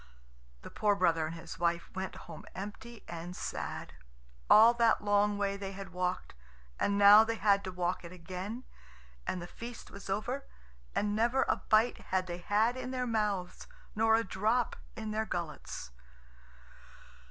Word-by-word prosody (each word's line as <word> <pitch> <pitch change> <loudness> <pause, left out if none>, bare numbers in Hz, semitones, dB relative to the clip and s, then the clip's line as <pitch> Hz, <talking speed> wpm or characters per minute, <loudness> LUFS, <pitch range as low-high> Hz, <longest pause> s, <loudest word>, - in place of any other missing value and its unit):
The - - -9
poor 210 -1 +2
brother 165 -4 +2
and 165 - -6
his 165 -1 -9
wife 170 0 0
went 190 0 -4
home - - -9
empty 210 +4 -8
and 170 +1 -6
sad. - - -5 0.6
All 225 +2 +9
that 230 -3 +3
long 205 0 +3
way 200 -1 0
they 195 -1 -5
had 195 -1 -8
walked, 180 0 -2 0.5
and 200 0 +1
now 205 +2 +9
they 225 0 -1
had 200 -2 +3
to 185 - -4
walk 180 0 -2
it 170 - -9
again, 185 +7 -6 0.6
and 185 - -1
the 175 - -6
feast 235 +6 -9
was 200 0 -10
over, 245 +8 -2 0.5
and 205 0 +1
never 240 +4 +2
a - - +2
bite 220 +3 +4
had 185 -1 -1
they 175 -1 -5
had 215 +6 +2
in 255 0 -5
their 255 -1 -2
mouths, 210 -6 -1 0.3
nor 225 +1 +4
a 225 - +2
drop 220 +5 0 0.2
in 220 -1 -5
their 220 +1 -1
gullets. 160 - -5
205 Hz, 165 wpm, -32 LUFS, 180-220 Hz, 0.6 s, All